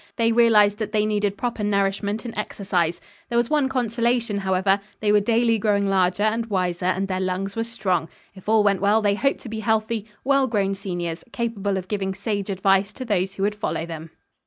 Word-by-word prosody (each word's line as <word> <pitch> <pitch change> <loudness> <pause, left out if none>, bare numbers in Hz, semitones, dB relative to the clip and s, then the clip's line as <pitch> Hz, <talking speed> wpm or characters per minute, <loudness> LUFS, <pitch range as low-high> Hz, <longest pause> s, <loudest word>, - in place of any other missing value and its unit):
They 230 0 +2
realized 215 -3 +5
that 215 0 -4
they 210 -1 +2
needed 205 -2 0
proper 235 -2 -3
nourishment 200 +2 0
and 235 - -6
exercise. 185 -5 -1 0.3
There 235 - 0
was 240 +2 +1
one 295 -3 +2
consolation 235 -3 0
however, 195 +1 +1 0.2
they 210 -1 +2
were 210 - +5
daily 230 +1 +2
growing 200 -1 +2
larger 190 0 +2
and 225 +2 0
wiser, 180 -3 -1
and 190 +1 0
their 185 -1 -2
lungs 190 +1 -2
were 225 - 0
strong. 185 -8 -1 0.2
If 190 +2 -9
all 220 -1 +5
went 200 -2 +2
well 210 +2 +3
they 205 -1 +3
hoped 275 +7 0
to 240 - -8
be 220 0 -4
healthy, 220 0 0 0.2
well 275 0 +3
grown 200 -4 0
seniors, 175 -4 -4
capable 205 -5 -2
of 185 -1 -5
giving 190 -2 -2
sage 200 0 -3
advice 195 +1 +2
to 255 - -7
those 195 -3 0
who 195 - -3
would 205 +1 +1
follow 205 -5 -3
them. 165 -1 -7
205 Hz, 205 wpm, -23 LUFS, 195-225 Hz, 0.3 s, realized